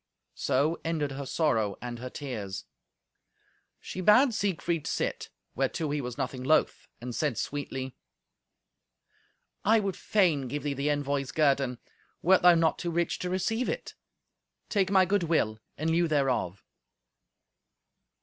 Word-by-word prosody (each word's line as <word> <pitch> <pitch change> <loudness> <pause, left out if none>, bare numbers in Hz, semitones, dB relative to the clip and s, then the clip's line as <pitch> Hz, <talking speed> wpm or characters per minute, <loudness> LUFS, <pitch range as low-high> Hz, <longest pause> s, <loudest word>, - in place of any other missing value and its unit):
So 140 +5 0
ended 155 -4 -1
her 135 0 -5
sorrow 115 - +1
and 120 -1 -6
her 125 +1 -6
tears. 110 -10 -5 1.1
She 185 - -6
bade 235 +7 +6
Siegfried 175 -6 -1
sit, - - -2 0.2
whereto 140 +4 -1
he 145 0 -1
was 125 -2 -6
nothing 130 -2 -3
loth, 155 +4 +2
and 125 +1 -6
said 145 -2 -1
sweetly, 135 -2 -4 1.7
"I 225 +2 +5
would 195 -3 -2
fain 175 -10 +2
give 145 +4 -4
thee 145 -1 -1
the 140 +2 -1
envoy's 140 -2 -1
guerdon, 135 -4 +2 0.5
wert 185 +2 +5
thou 180 -1 +7
not 165 -1 +2
too 175 - -2
rich 170 0 -1
to 180 - -3
receive 225 +7 0
it. - - -4 0.8
Take 195 -3 +1
my 190 -1 +5
good 200 +2 +1
will 155 -10 +1 0.2
in 160 +2 0
lieu 170 +1 +3
thereof." 135 - 0
150 Hz, 140 wpm, -29 LUFS, 130-175 Hz, 1.7 s, thou